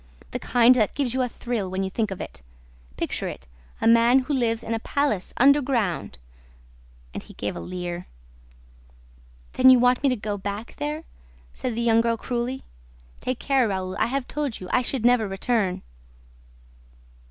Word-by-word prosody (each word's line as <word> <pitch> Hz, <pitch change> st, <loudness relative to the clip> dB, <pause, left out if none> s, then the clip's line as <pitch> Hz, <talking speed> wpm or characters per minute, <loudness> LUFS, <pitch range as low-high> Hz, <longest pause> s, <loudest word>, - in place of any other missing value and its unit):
"The -, -, -3 dB
kind 245 Hz, 0 st, +5 dB
that 220 Hz, -5 st, +1 dB
gives 265 Hz, -5 st, -1 dB
you 260 Hz, -, 0 dB
a 250 Hz, -, 0 dB
thrill, 230 Hz, -6 st, -3 dB
when 190 Hz, +1 st, -2 dB
you 190 Hz, -, -3 dB
think 215 Hz, +1 st, -1 dB
of 190 Hz, -, -6 dB
it... -, -, -8 dB, 0.6 s
Picture -, -, -2 dB
it: 65 Hz, -, -7 dB, 0.3 s
a -, -, +1 dB
man 230 Hz, +2 st, +6 dB
who 265 Hz, +2 st, 0 dB
lives 230 Hz, -4 st, 0 dB
in 230 Hz, -, -3 dB
a 225 Hz, -, -1 dB
palace 255 Hz, -7 st, -1 dB
underground!" 250 Hz, -, +2 dB, 1.0 s
And -, -, -5 dB
he -, -, -15 dB
gave 105 Hz, -, -3 dB
a -, -, -5 dB
leer. 175 Hz, -1 st, -5 dB, 1.5 s
"Then 255 Hz, 0 st, +6 dB
you 255 Hz, -, +8 dB
want 245 Hz, +1 st, +3 dB
me 280 Hz, -, +3 dB
to 255 Hz, -, +1 dB
go 210 Hz, -2 st, -4 dB
back 205 Hz, +3 st, -6 dB
there?" 150 Hz, +1 st, -3 dB, 0.5 s
said 245 Hz, -, -4 dB
the 235 Hz, -, -1 dB
young 230 Hz, -1 st, +4 dB
girl 230 Hz, 0 st, 0 dB
cruelly. 245 Hz, +2 st, -3 dB, 0.6 s
"Take 255 Hz, -1 st, -2 dB
care, 270 Hz, -3 st, +2 dB
Raoul; 190 Hz, -2 st, -3 dB
I -, -, +2 dB
have 265 Hz, +1 st, -2 dB
told 290 Hz, -6 st, -3 dB
you: 185 Hz, -, -8 dB
I 250 Hz, -, +3 dB
should 250 Hz, -1 st, -2 dB
never 245 Hz, -3 st, +4 dB
return!" 195 Hz, 0 st, -1 dB
230 Hz, 175 wpm, -24 LUFS, 195-255 Hz, 1.5 s, you